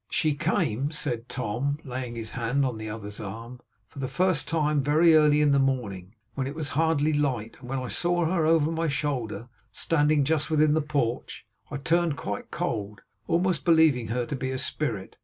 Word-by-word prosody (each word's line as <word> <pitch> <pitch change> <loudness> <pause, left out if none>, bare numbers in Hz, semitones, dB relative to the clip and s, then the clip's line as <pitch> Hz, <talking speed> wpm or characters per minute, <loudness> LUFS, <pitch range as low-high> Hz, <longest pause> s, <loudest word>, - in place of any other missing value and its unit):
'She 155 -2 +1
came' 145 - 0
said 130 -6 -3
Tom, 130 +3 -2
laying 125 -3 -5
his 115 -1 -5
hand 125 +3 0
upon 120 -4 -3
the 110 0 -5
other's 105 -1 -6
arm, 115 +5 -7 0.3
'for 140 - -12
the 130 - -2
first 180 0 +1
time 150 -3 +1
very 155 +4 +4
early 150 -1 +5
in 150 -1 +4
the 140 - +4
morning, 110 -8 -2 0.2
when 130 +1 -2
it 140 - -6
was 155 -2 -3
hardly 155 -1 +1
light; 130 -7 -1
and 125 -1 -11
when 135 - -2
I 130 -1 -3
saw 175 +5 0
her, 165 0 +1
over 160 -1 +3
my 165 0 -1
shoulder, 130 -7 -2 0.2
standing 150 -2 +2
just 155 +2 0
within 155 -1 +3
the 160 - +2
porch, 140 -6 -2 0.2
I 145 - -4
turned 165 +1 +1
quite 100 -5 -5
cold, 100 0 -3 0.3
almost 175 -1 +1
believing 160 -8 +4
her 120 +2 -1
to 145 - -4
be 130 0 -3
a 130 - -2
spirit. 125 -6 -3
140 Hz, 195 wpm, -26 LUFS, 120-155 Hz, 0.3 s, early